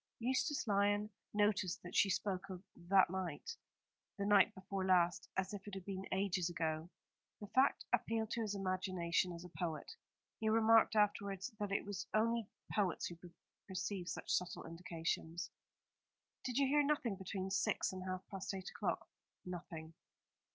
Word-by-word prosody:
Eustace 260 +5 +1
Lyon 205 0 +2 0.2
noticed 205 -3 +2
that 175 - -7
she 200 - +5
spoke 195 0 -1
of 185 -1 -6
"that 185 +1 +4
night," 190 - -3 0.6
the 200 - -1
night 200 -2 +6
before 190 0 -3
last, 180 -2 +3
as 190 +1 0
if 205 0 -7
it 205 - -5
had 190 -2 -6
been 195 -1 -4
ages 190 -2 +1
ago. 160 -1 -1 0.5
The 210 - -6
fact 260 +7 +3
appealed 225 0 +1
to 235 - 0
his 210 -2 -1
imagination 185 -2 0
as 170 0 -7
a - - -9
poet. 165 -4 -2 0.5
He 220 - +1
remarked 225 0 +6
afterwards 200 0 +1
that 205 -1 -2
it 200 - 0
is 205 -1 -4
only 230 0 +2 0.2
poets 195 -5 +1
who 170 -1 -6 0.5
perceive 190 -1 -3
such - - -4
subtle 180 -1 -1
indications. 165 0 -3 0.9
"Did 250 -1 -1
you 280 - +5
hear 290 +2 +4
nothing 280 -7 +1
between 190 0 -4
six 190 - +1
and 185 0 -5
half 185 0 -4
past 195 0 -3
eight 190 -1 -5
o'clock?" - - -2 0.4
"Nothing." 165 -3 -6
195 Hz, 160 wpm, -38 LUFS, 180-210 Hz, 0.9 s, night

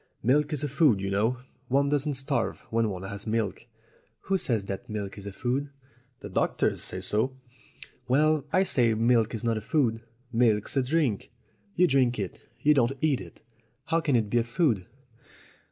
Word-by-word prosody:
Milk 145 +6 +3
is 150 -1 -2
a - - 0
food, 140 -6 +3
you 95 0 -3
know; 110 +6 0 0.3
one 140 +3 +2
doesn't 145 0 0
starve 135 +2 -1
when 115 -1 +1
one 95 -2 -5
has 100 +2 -6
milk." 110 0 -2 0.5
"Who 195 0 0
says 115 - 0
that 100 +5 -6
milk 105 -2 -4
is 100 -1 -8
a - - -4
food?" 130 +7 -2 0.5
"The - - -6
doctors - - 0
say 90 - -3
so." 110 +7 0 0.7
"Well, 150 +3 +3
I 185 - +4
say 120 -11 +2
milk 115 0 +2
is 110 - -5
not 115 -1 +1
a - - -12
food. 115 -3 0 0.3
Milk's 115 -2 +2
a 135 - +3
drink. 130 -5 0 0.5
You 180 - +5
drink 130 -5 +2
it; 100 -4 -5 0.2
you 150 - +5
don't 130 -2 +2
eat 145 -7 +1
it. 85 -3 -13 0.4
How 165 +1 +1
can 145 -5 +1
it 110 -3 +1
be 120 - +3
a - - +1
food?" 115 - 0
120 Hz, 185 wpm, -27 LUFS, 110-140 Hz, 0.7 s, You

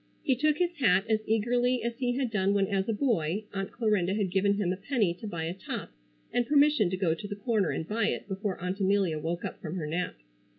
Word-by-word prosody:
He 265 - +2
took 300 +3 +2
his 355 0 +1
hat 200 -5 +4
as 220 -1 +2
eagerly 245 +2 +2
as 235 0 -2
he 245 -2 +1
had 260 -3 -1
done 200 -1 +2
when 200 -1 +3
as 195 +1 -1
a - - +3
boy 210 - 0
Aunt 195 -1 -3
Clarinda 205 -5 +1
had 200 -4 0
given 200 +2 +2
him 190 -3 0
a - - -3
penny 205 -3 0
to 215 +5 -8
buy 170 -5 -4
a 165 +2 -2
top 190 - -6 0.4
and 245 -1 +1
permission 290 -8 +4
to 185 - -2
go 180 -4 +2
to 205 +5 -6
the 205 - -5
corner 205 -3 0
and 160 - -3
buy 215 0 +1
it - - -2
before 195 -1 -3
Aunt 180 +3 -3
Amelia 190 -5 +2
woke 170 +3 -3
up - - -6
from 160 +1 -5
her 170 -5 -3
nap. 165 - -2
200 Hz, 245 wpm, -29 LUFS, 185-235 Hz, 0.4 s, hat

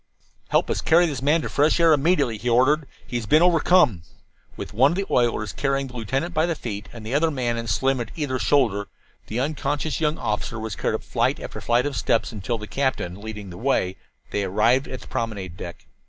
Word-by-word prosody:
"Help - - +2
us - - -1
carry 170 +2 +5
this 145 -6 -3
man 150 +3 +2
to - - -2
fresh 150 +4 +2
air 165 -1 +6
immediately," 145 - +2
he 120 +3 -2
ordered. 135 +5 +3 0.2
"He 125 -1 -3
has 115 -3 -5
been 155 +9 +5
overcome." 170 - +4 0.6
With - - -7
one 135 +8 +4
of - - -3
the 195 +1 -1
oilers 115 -4 +1
carrying 135 -1 0
the 125 -1 -11
lieutenant 135 +9 -2
by 160 +1 +2
the 170 - -1
feet, 105 -6 -6
and 115 -2 -10
the 115 - -4
other 160 +3 +3
man 125 -5 -1
and 115 -1 -4
Slim 130 +5 +1
at 115 - -5
either 140 -5 -2
shoulder, 105 -3 +2 0.4
the 110 - -3
unconscious 145 +2 -2
young 150 0 +1
officer 110 +1 -3
was 110 -2 -4
carried - - -1
up - - -5
flight - - 0
after - - -7
flight 120 +2 +2
of 145 -2 -2
steps 115 - +1
until, 110 +2 -3
the 105 - -7
captain 105 -8 -2
leading 105 -3 -7
the 85 - -9
way, 115 -7 +1 0.4
they 100 - 0
arrived 110 +8 +2
at 130 - -7
the - - -13
promenade 105 -8 -4
deck. 85 -2 -9
125 Hz, 220 wpm, -24 LUFS, 110-145 Hz, 0.6 s, air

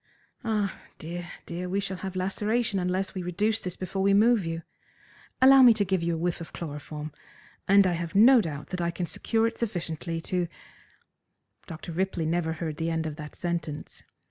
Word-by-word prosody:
Ah, 210 -4 -1 0.2
dear, 175 +2 -6 0.2
dear, 180 +2 -5
we 195 +2 0
shall 195 -1 -3
have 190 0 -6
laceration 205 +3 0
unless 185 +2 -1
we 185 - -4
reduce 205 +5 0
this 180 -1 -5
before 190 +1 -3
we 195 +1 +4
move 225 0 +5
you. 165 0 -4 0.8
Allow 270 0 +9
me 240 -3 +8
to 205 -2 +1
give 190 -1 0
you 170 0 0
a - - -3
whiff 170 +1 -1
of 165 - -9
chloroform, 150 -1 -6 0.6
and 200 0 +6
I 180 - +2
have 170 0 -4
no 240 +4 +8
doubt 150 -6 -6
that 180 -1 -3
I 170 - +1
can 175 +1 -3
secure 225 +6 0
it 230 0 -2
sufficiently 170 -6 -3
to 180 0 -1 0.6
" - - -40
Dr. 165 0 -7
Ripley 180 -1 -1
never 160 0 0
heard 160 -2 -4
the 165 0 -1
end 160 -1 -1
of 155 -2 -4
that 150 -2 -8
sentence. 170 -4 -4
180 Hz, 195 wpm, -27 LUFS, 165-200 Hz, 0.8 s, Allow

